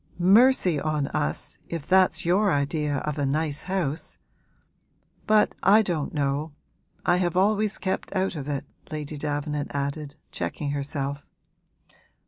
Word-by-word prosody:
'Mercy 190 - +5
on 155 -1 -1
us, 75 +1 -3
if 165 -4 -4
that's 185 +1 +4
your 195 +4 +3
idea 145 0 0
of 150 0 -3
a 145 - +1
nice 150 +1 -1
house! 170 -5 -2 1.1
But 215 0 +4
I 215 +3 +6
don't 165 -7 -2
know 145 +1 -1 0.5
I 175 - +4
have 175 -1 0
always 210 +1 +2
kept 190 - -3
out 190 -1 0
of 145 -2 -5
it,' 140 -2 -3 0.2
Lady 150 -1 -4
Davenant 145 0 -3
added, 140 +1 -3 0.2
checking 145 -2 -3
herself. 140 0 -3
155 Hz, 130 wpm, -25 LUFS, 145-185 Hz, 1.1 s, I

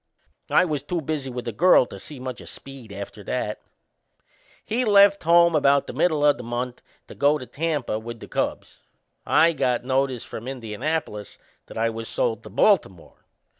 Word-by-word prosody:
I 185 - +4
was 150 -5 -2
too 170 +5 -3
busy 150 -3 -3
with 125 -1 -6
the 115 - -3
girl 160 - +5
to 100 - -11
see 140 +7 -9
much 130 -1 -6
o' - - -12
Speed 135 -5 -11
after 100 +1 -8
that. 110 -4 -3 1.0
He 240 +4 0
left 200 -2 +5
home 170 0 +5
about 140 -2 +3
the - - -7
middle 155 -4 +1
o' 145 0 +6
the 125 - -10
month 120 +1 -4 0.3
to - - -10
go 145 +2 +2
to 130 - -8
Tampa 145 -7 -2
with 115 +1 -8
the - - -10
Cubs. - - -3 0.5
I 165 +1 +4
got 125 -4 0
notice 130 -2 0
from 115 - -8
Indianapolis 125 -1 -4 0.3
that - - -10
I 115 +1 +1
was 115 0 -6
sold 110 -2 -1
to 110 - -11
Baltimore. 115 - 0
135 Hz, 180 wpm, -24 LUFS, 115-155 Hz, 1.0 s, o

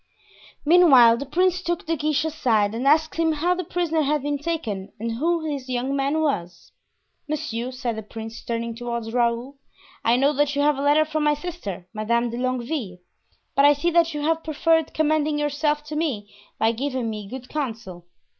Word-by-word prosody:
Meanwhile 280 -9 +7
the 280 +2 -6
prince 365 +4 +1
took 345 -1 -2
De 330 +1 0
Guiche 305 0 0
aside 225 -10 +1
and 245 +4 -2
asked 315 +2 +3
him 325 -1 +2
how 335 +4 +1
the 365 0 -3
prisoner 330 -2 0
had 295 -1 0
been 290 0 -1
taken 225 - -3
and 230 +1 -3
who 320 +7 0
this 275 -4 -4
young 255 +2 -1
man 280 +3 0
was. 180 - -3 0.6
"Monsieur," 245 -5 -3
said 250 -3 -3
the 220 - -5
prince, 225 +2 -8
turning 230 0 -3
toward 235 -1 -4
Raoul, 240 +3 0 0.5
"I 230 - +4
know 275 +4 +3
that 290 0 +1
you 285 - +1
have 295 -2 +2
a - - -1
letter 295 +2 +4
from 310 0 -2
my 295 0 +3
sister, 295 - -6
Madame 235 +2 0
de 235 - -5
Longueville; 250 - -2 0.6
but 275 - +3
I 290 +1 +7
see 340 +5 0
that 335 -2 +3
you 295 - -3
have 325 +2 0
preferred 320 +1 +1
commending 310 -1 +1
yourself 295 0 0
to 300 0 -7
me 250 -11 -2 0.2
by 220 +1 +3
giving 255 0 -2
me 210 -2 -5
good 255 +1 -8
counsel." 220 - -5
280 Hz, 190 wpm, -23 LUFS, 235-310 Hz, 0.6 s, Meanwhile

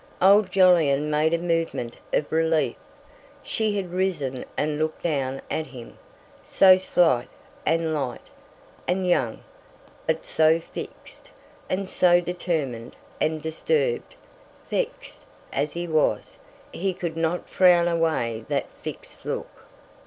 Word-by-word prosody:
Old 195 +1 +5
Jolyon 160 -6 +4
made 155 +1 +2
a 170 - +2
movement 165 -8 -2
of 150 - 0
relief. 160 -5 +1 0.7
She 215 -2 -1
had 185 -3 -3
risen 160 -9 -1
and 150 0 -1
looked 155 0 -2
down 135 -5 -1
at 160 - -2
him; 125 -3 -12 0.4
so 185 -1 +6
slight, 165 -9 +2 0.4
and 165 0 +1
light, 135 -5 -4 0.6
and 185 +1 0
young, 130 -11 0 0.6
but 160 0 0
so 160 +1 +3
fixed, 170 - -10 0.4
and 190 +1 -1
so 175 -1 +4
determined; 160 -10 -3 0.2
and 155 0 0
disturbed, 465 - -1 0.6
vexed, - - -3 0.3
as 145 0 -1
he 175 0 -4
was, 155 -2 0 0.3
he 190 0 -2
could 170 -3 -4
not 165 +2 -1
frown 175 -2 +5
away 160 -10 0
that - - 0 0.2
fixed - - -8
look. - - -6
165 Hz, 125 wpm, -25 LUFS, 150-180 Hz, 0.7 s, so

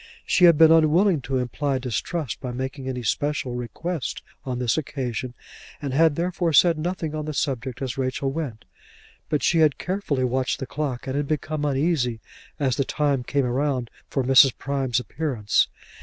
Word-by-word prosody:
She 180 - +4
had 170 -3 +7
been 160 0 +7
unwilling 165 +2 +4
to 130 +1 -2
imply 135 +2 -1
distrust 130 - -3
by 125 -2 -4
making 130 +1 -4
any 125 -2 -4
special 145 0 -1
request 130 +7 -4 0.2
on 130 -2 -3
this 125 -2 +1
occasion, 130 -4 -3 0.4
and 140 -3 -4
had 160 +1 +4
therefore 175 0 -1
said 165 +3 +5
nothing 165 -2 -3
on 155 -1 -3
the 155 -1 -4
subject 130 -2 -2
as 130 0 -4
Rachel 130 +1 -1
went; 135 -7 -5 0.6
but 150 - 0
she 165 - +3
had 155 -3 +4
carefully 180 -8 -2
watched 130 +1 0
the 135 - -5
clock, 135 -3 -4
and 135 0 -3
had 145 0 -1
become 155 0 -2
uneasy 135 -4 0 0.4
as 135 -4 +1
the 140 - +2
time 140 -2 0
came 140 +2 0
round 130 -1 -1 0.2
for 135 - 0
Mrs. 130 0 +6
Prime's 135 -3 -1
appearance. 125 -6 0
140 Hz, 170 wpm, -24 LUFS, 130-155 Hz, 0.6 s, had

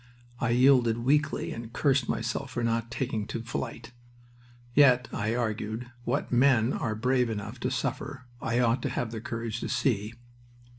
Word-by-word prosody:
I 125 - 0
yielded 125 -2 +5
weakly, 150 +4 +1
and 115 0 -7
cursed 135 -1 +2
myself 120 +4 -2
for 120 -1 -3
not 115 0 0
taking 115 -4 -2
to 115 - -4
flight. 115 +1 -5 0.8
Yet, 125 -3 +5
I 110 +3 -1
argued, 115 0 -3
what 140 +5 -1
men 125 -1 +4
are 110 -3 -2
brave 125 +2 +1
enough 105 +2 -5
to 125 - -1
suffer 130 +1 -3 0.2
I 115 +1 0
ought 120 +1 +2
to 140 - -1
have 120 -2 -2
the 110 -2 -5
courage 115 -1 -4
to - - -4
see... 110 -3 0
120 Hz, 160 wpm, -28 LUFS, 115-130 Hz, 0.8 s, yielded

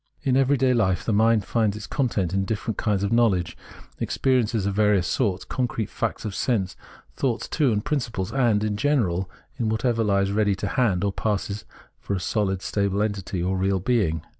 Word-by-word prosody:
In 135 -3 +2
every 135 +1 +3
day 130 0 +3
life 95 -7 +1
the 110 - +1
mind 110 -1 +3
finds 110 0 0
its 105 - -7
content 110 - -1
in 95 0 +1
different 110 +1 -3
kinds 100 -2 0
of 100 - -1
knowledge, 110 -7 +2 0.4
experiences 115 -6 +1
of 100 - 0
various 105 -3 +3
sorts, 100 -5 0
con 125 -1 -1
crete 110 -3 -4
facts - - -3
of 105 - -3
sense, 100 -4 -1 0.4
thoughts, 125 -4 -1
too, 145 -6 +1
and 105 -1 -1
principles, 115 -10 -2
and, 120 -6 +2
in 105 -1 -1
general, 100 -10 +1 0.3
in 115 -3 0
whatever 115 +1 0
Ues 100 -2 +2
ready 105 -1 +2
to 100 +1 -3
hand, 100 -8 +1
or 100 -1 0
passes 105 -1 -2 0.3
for 100 - -3
a - - -1
sohd 95 0 -1
stable 100 0 0
entity, 95 -4 -3
or 95 +1 0
real 95 +1 +1
being. 90 -7 0
105 Hz, 190 wpm, -24 LUFS, 95-115 Hz, 0.4 s, every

